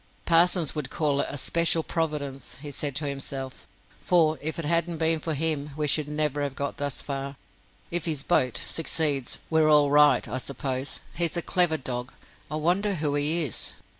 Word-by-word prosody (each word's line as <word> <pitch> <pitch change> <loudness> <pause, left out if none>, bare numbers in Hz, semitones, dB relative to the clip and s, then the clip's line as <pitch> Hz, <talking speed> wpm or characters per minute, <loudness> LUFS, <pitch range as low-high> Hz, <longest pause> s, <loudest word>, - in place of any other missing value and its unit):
"Parsons 170 -1 +4
would 150 -4 -4
call 145 -3 +1
it - - -2
'a - - -5
special 165 +3 +2
providence,'" 150 -6 -3
he 145 0 -7
said 140 0 -1
to 150 +1 -1
himself. 135 -1 -5 0.4
"For 160 -3 +3
if 160 +2 -2
it 165 - -3
hadn't 170 +1 +1
been 160 0 +1
for 160 0 -2
him, 150 -1 -1
we 150 - 0
should 150 0 +2
never 150 -1 -1
have 140 -2 -3
got 140 0 -3
thus 145 -3 -3
far. 140 0 -4 0.6
If 170 -1 +2
his 155 -5 -1
'boat' 130 -8 +2
succeeds, 150 -5 0
we're 160 -1 +4
all 145 -2 +5
right, 145 -3 +5
I 130 - -3
suppose. 135 0 -3
He's 170 +1 0
a 170 - -1
clever 175 -3 +2
dog. 125 -1 -4 0.4
I 155 - -4
wonder 185 +6 +1
who 150 -3 -1
he 150 +4 +2
is." 135 - -5
150 Hz, 185 wpm, -26 LUFS, 140-165 Hz, 0.6 s, all